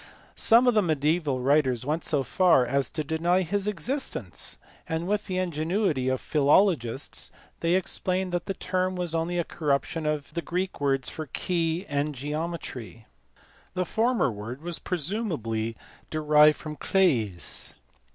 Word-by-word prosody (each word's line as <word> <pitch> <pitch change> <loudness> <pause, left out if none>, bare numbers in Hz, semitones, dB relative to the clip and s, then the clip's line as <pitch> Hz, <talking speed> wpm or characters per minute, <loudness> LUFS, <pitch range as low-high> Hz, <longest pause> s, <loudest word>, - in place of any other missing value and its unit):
Some 235 +3 +6
of 245 - +5
the 215 - +4
mediaeval 155 -4 +1
writers 130 -3 +2
went 155 +3 -1
so 145 -3 +1
far 165 -1 +4
as 135 +1 0
to 155 - -3
deny 170 +5 +1
his 200 +4 -1
existence, 260 +7 -3 0.3
and 160 +1 -2
with 210 +1 0
the 185 -2 -2
ingenuity 165 -4 0
of 130 -1 0
philologists 145 - +2 0.3
they 170 +1 +2
explained 185 0 -1
that 175 -1 -2
the 195 - -2
term 185 +1 -1
was 175 -2 -2
only 165 +2 -1
a 170 - +2
corruption 155 0 -1
of 150 -2 -1
VK\L 160 -6 -1
a - - -12
key, 170 +4 -1
and 145 0 -1
Sis 125 - -8
geometry. 150 -7 -5 0.7
The 180 0 0
former 225 - +1
word 115 +7 -7
was 175 -1 -3
presumably 150 - -2 0.3
derived 150 -1 +5
from 150 -1 -7
K\LS. 115 - +1
160 Hz, 140 wpm, -27 LUFS, 140-185 Hz, 0.7 s, Some